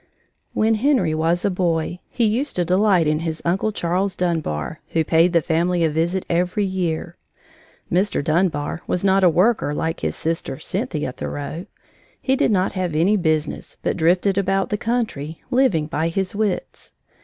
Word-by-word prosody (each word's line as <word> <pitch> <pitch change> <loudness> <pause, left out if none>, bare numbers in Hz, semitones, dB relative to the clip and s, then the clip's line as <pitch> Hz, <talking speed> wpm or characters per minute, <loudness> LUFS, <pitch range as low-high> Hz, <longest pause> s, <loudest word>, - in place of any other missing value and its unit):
When 220 +1 +3
Henry 270 - +2
was 165 +2 +1
a 200 - +2
boy, 175 -1 -1
he 235 - 0
used 240 +7 0
to 175 - +1
delight 185 -1 +3
in 155 0 +1
his 160 -1 -3
Uncle 190 +5 +1
Charles 185 0 -1
Dunbar, 155 - -2
who 165 - +2
paid 165 +3 +3
the 170 -2 +2
family 170 +1 +1
a 160 - +2
visit 170 +4 0
every 180 +4 0
year. 180 -4 -2 0.7
Mr. 185 -3 +1
Dunbar 155 -1 0
was 180 - -1
not 195 0 +3
a 180 - +7
worker 180 -3 +2
like 160 +1 -2
his 80 -1 -2
sister, 165 -4 -2
Cynthia 160 - -3
Thoreau. 145 +7 -6 0.5
He 265 - +1
did - - +2
not 190 -3 +2
have 180 -4 -2
any 180 +7 +3
business 155 -5 -1
but - - 0
drifted 180 +4 +2
about 195 0 0
the 210 - -1
country, 215 - -2
living 245 - +3
by 160 +1 -1
his 185 +2 -2
wits. 205 -2 -3
175 Hz, 165 wpm, -21 LUFS, 160-195 Hz, 0.7 s, a